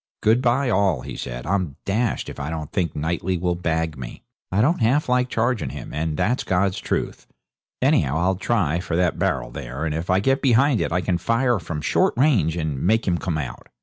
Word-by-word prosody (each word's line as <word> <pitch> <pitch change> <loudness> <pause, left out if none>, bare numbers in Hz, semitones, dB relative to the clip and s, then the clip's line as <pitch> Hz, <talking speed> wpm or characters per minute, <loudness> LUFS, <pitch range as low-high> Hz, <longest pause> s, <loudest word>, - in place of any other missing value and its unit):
'Good 110 +4 +4
bye, 130 +2 +2
all,' 95 - +2
he - - -7
said. - - -6
'I'm 90 -7 -1
dashed 110 +3 0
if - - -8
I 70 +1 -3
don't 80 -2 -5
think 85 -5 -1
Knightley 85 +4 -1
will 90 +1 0
bag 80 -2 -1
me. - - -8 0.3
I 95 - +1
don't 140 +9 +2
half 130 +7 +2
like 125 0 +2
charging 120 0 0
him, - - -8
and 75 0 -2
that's 125 +4 +1
God's 95 0 +1
truth. - - -3 0.6
Anyhow 80 - +3
I'll 90 +3 +2
try 90 -6 0
for 85 -2 -3
that 90 -1 +1
barrel - - 0
there; 65 +6 -5
and 80 - -1
if 80 +4 -4
I 90 +1 +4
get 135 +7 +1
behind 130 0 +3
it - - -1
I 90 +2 +1
can 90 -1 0
fire 115 +4 +1
from 80 -3 -5
short - - +2
range 115 - +3
and 80 -5 -2
make 110 +4 +2
him 85 -2 +1
come 85 -4 -2
out.' 70 -5 -6
90 Hz, 215 wpm, -23 LUFS, 80-115 Hz, 0.6 s, Good